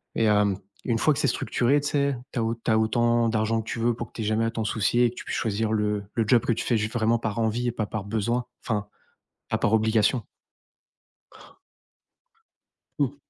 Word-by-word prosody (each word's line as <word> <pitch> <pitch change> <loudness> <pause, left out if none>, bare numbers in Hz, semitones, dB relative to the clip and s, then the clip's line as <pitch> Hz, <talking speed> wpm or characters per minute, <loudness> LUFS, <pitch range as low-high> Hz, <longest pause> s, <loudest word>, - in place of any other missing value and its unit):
Et 115 - +2
hem, 105 -2 +3 0.3
une 115 -2 +1
fois 155 - +4
que - - -4
c'est - - +2
structuré, 130 +2 +1
tu 145 - -2
sais, 140 -2 +1 0.2
tu 125 - -1
as - - +1 0.2
tu 115 - +2
as 110 - +4
autant 120 +1 +2
d'argent 110 0 +1
que 110 - -10
tu 115 - -3
veux 120 +1 +2
pour 120 -1 -5
que - - -30
tu 115 - -6
aies - - -3
jamais 110 +2 +1
à - - +1
t'en 115 -1 -3
soucier 115 +3 +2
et 120 - +3
que 120 - -16
tu - - -8
puisses - - -3
choisir 110 0 -1
le 105 -1 0
le 115 - +1
job 120 0 +4
que 120 - +2
tu - - -3
fais 120 - +2
juste 110 +2 -2
vraiment 115 0 +2
par 110 -1 -3
envie 115 +2 0
et 120 - +1
pas 110 -3 -2
par 105 -2 -4
besoin 115 +3 -1 0.2
enfin, 105 -3 -2 0.6
pas - - 0
par - - +1
obligation. 110 +1 +2 2.7
Mmh. 140 -1 +1
115 Hz, 225 wpm, -26 LUFS, 110-120 Hz, 2.7 s, fois